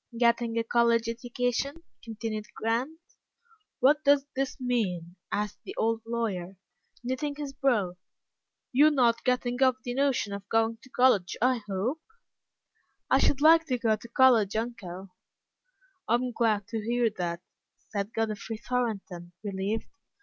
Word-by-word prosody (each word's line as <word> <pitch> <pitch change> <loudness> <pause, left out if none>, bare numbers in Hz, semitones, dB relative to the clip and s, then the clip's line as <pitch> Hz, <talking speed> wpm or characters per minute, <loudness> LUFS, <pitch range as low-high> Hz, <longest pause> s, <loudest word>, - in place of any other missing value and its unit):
"Getting 235 -1 +2
a 230 - +2
college 235 0 +2
education?" 245 +6 -2 0.2
continued 220 -1 -5
Grant. 240 +8 -1 0.8
"What 295 +3 +4
does 285 -1 +4
this 270 +1 -2
mean?" 190 -9 -1 0.2
asked 210 0 -2
the 385 - -8
old 225 0 +1
lawyer, 195 -6 -3 0.5
knitting 285 +4 -2
his 290 -2 -6
brow. 235 -11 +1 0.7
"You're 290 +4 +6
not 240 -5 +2
getting 250 0 0
off 260 -1 +5
the 245 - -3
notion 265 -6 +1
of 200 0 -7
going 225 0 +2
to 260 - -17
college, 245 -8 +3
I 250 0 +2
hope?" 225 +11 -2 1.1
"I - - +6
should 285 - +2
like 325 +1 +6
to 255 - 0
go 225 -2 +2
to 220 - -12
college, 235 -4 +4
uncle." 200 -5 -4 1.0
"I'm 245 +2 +1
glad 220 -3 +1
to 225 -2 -3
hear 235 0 +1
that," 170 0 -3 0.5
said 200 0 -3
Godfrey 220 0 -3
Thornton, 210 -8 -3
relieved. 200 +2 -2
235 Hz, 135 wpm, -28 LUFS, 210-255 Hz, 1.1 s, You're